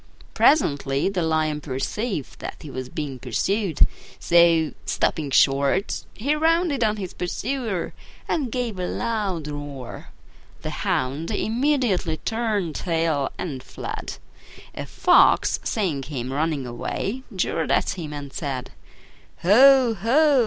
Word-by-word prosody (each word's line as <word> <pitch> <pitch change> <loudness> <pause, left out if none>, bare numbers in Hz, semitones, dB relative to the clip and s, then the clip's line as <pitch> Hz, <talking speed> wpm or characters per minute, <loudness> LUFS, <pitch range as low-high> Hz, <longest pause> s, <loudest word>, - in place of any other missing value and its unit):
Presently 140 - +3
the 190 -2 -1
lion 155 -2 0
perceived 150 - -3
that - - -6
he 150 - -9
was 130 -1 -5
being 140 -3 -5
pursued; 165 - -1 0.4
so, 170 -2 +4
stopping 150 -3 0
short, 140 +8 +2
he 275 +8 0
rounded 320 -3 +2
on 215 -1 +1
his 190 -4 -5
pursuer 220 +1 -3 0.3
and 275 -7 -1
gave 235 -6 -2
a 180 - -1
loud 205 -9 -2
roar. 145 -4 -7 0.6
The - - -3
Hound 140 +6 -1
immediately 230 - +1
turned 215 -7 -1
tail 160 -4 0
and 145 -8 -4
fled. - - -6 0.6
A - - -6
Fox, - - +4
seeing 185 - -1
him 130 -2 -5
running 150 -2 -1
away, 195 - -3
jeered 165 -3 0
at - - +2
him 165 -5 -6
and 145 -2 -7
said, 135 -5 -4 0.7
"Ho! 255 +5 +7
ho! 270 - +3
170 Hz, 125 wpm, -24 LUFS, 145-225 Hz, 0.7 s, Ho